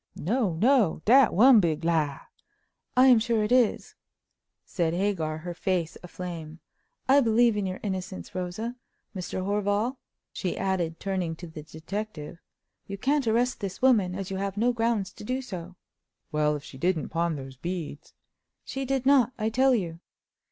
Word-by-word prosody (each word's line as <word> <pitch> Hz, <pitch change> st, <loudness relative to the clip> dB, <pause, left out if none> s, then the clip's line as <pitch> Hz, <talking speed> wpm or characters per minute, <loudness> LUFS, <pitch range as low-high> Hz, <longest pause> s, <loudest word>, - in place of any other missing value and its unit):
"No, 210 Hz, -, 0 dB
no! 215 Hz, -, +2 dB
dat 255 Hz, +1 st, +6 dB
one 240 Hz, +5 st, +7 dB
big 165 Hz, -4 st, 0 dB
lie!" 155 Hz, -4 st, 0 dB, 0.8 s
"I 255 Hz, -, +7 dB
am 250 Hz, -3 st, +7 dB
sure 225 Hz, -1 st, +1 dB
it 210 Hz, -, -2 dB
is!" 250 Hz, -4 st, +2 dB, 0.7 s
said 170 Hz, -3 st, -1 dB
Hagar, 175 Hz, -5 st, -1 dB
her 175 Hz, +2 st, -6 dB
face 175 Hz, -2 st, -1 dB
aflame. 170 Hz, -3 st, -7 dB, 0.5 s
"I 275 Hz, +2 st, +6 dB
believe 230 Hz, -1 st, +3 dB
in 205 Hz, -2 st, -1 dB
your 185 Hz, 0 st, -5 dB
innocence, 190 Hz, -2 st, -5 dB
Rosa. 185 Hz, +7 st, -4 dB, 0.4 s
Mr. 185 Hz, 0 st, -4 dB
Horval," 205 Hz, +5 st, 0 dB, 0.4 s
she 185 Hz, -, -3 dB
added, 180 Hz, -4 st, -1 dB
turning 185 Hz, -4 st, -2 dB
to 175 Hz, -, -9 dB
the 160 Hz, -2 st, -9 dB
detective, 165 Hz, +1 st, -7 dB, 0.5 s
"you 200 Hz, -, -5 dB
can't 275 Hz, +3 st, +1 dB
arrest 240 Hz, +3 st, +1 dB
this 195 Hz, -2 st, -5 dB
woman, 215 Hz, -9 st, +3 dB
as 195 Hz, 0 st, -5 dB
you 190 Hz, -, -2 dB
have 195 Hz, 0 st, -3 dB
no 240 Hz, +3 st, +2 dB
grounds 225 Hz, -5 st, -1 dB
to -, -, -11 dB
do 255 Hz, +5 st, -2 dB
so." 185 Hz, -8 st, -7 dB, 0.6 s
"Well, 150 Hz, 0 st, +1 dB
if 145 Hz, -, -7 dB
she 130 Hz, -, -12 dB
didn't 175 Hz, -1 st, 0 dB
pawn 170 Hz, -1 st, 0 dB
those 135 Hz, -2 st, -8 dB
beads—" 160 Hz, 0 st, -6 dB, 0.5 s
"She 270 Hz, 0 st, -4 dB
did 265 Hz, -1 st, -1 dB
not, 265 Hz, -3 st, +4 dB
I 215 Hz, -1 st, 0 dB
tell 260 Hz, +3 st, +3 dB
you." 170 Hz, -6 st, -3 dB
190 Hz, 165 wpm, -27 LUFS, 170-235 Hz, 0.8 s, one